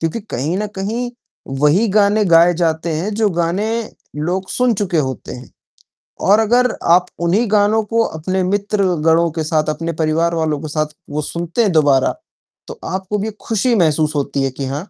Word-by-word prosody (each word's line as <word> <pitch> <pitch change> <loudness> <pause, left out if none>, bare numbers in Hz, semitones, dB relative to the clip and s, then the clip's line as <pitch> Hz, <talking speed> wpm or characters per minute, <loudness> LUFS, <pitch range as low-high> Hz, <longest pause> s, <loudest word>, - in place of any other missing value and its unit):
क्योंकि 165 +8 -2
कहीं 150 +9 -2
न 210 - -1
कहीं 235 +5 -2 0.5
वही 155 +10 +4
गाने 205 +1 +3
गाए 170 0 +5
जाते 165 -1 -1
हैं 190 +7 -2
जो 215 -1 +2
गाने 175 +5 -1 0.5
लोग 180 +5 -2
सुन 250 -2 +2
चुके 190 -4 -2
होते 130 -3 -3
हैं 125 +1 -10 0.8
और 210 - +6
अगर 245 +2 +3 0.2
आप 180 +1 +5 0.2
उन्हीं 190 +8 +2
गानों 215 +1 +3
को 230 +2 +1
अपने 185 +4 -2
मित्रगणों 180 -4 +1
के 160 0 -3
साथ, 155 0 +1
अपने 165 +2 -3
परिवार 160 +2 0
वालों 155 -3 -1
के 155 - -5
साथ 155 0 -1 0.4
सुनते 170 +8 -2
हैं 200 - +2
दोबारा, 145 -4 +3 0.5
तो 475 0 -9
आपको 190 +2 -3
भी 220 +2 -3
खुशी 235 +2 0
महसूस 155 -5 +2
होती 140 -1 -1
है 135 - -1
कि 135 +1 -5
हाँ, 145 +9 -5
175 Hz, 175 wpm, -18 LUFS, 155-210 Hz, 0.8 s, और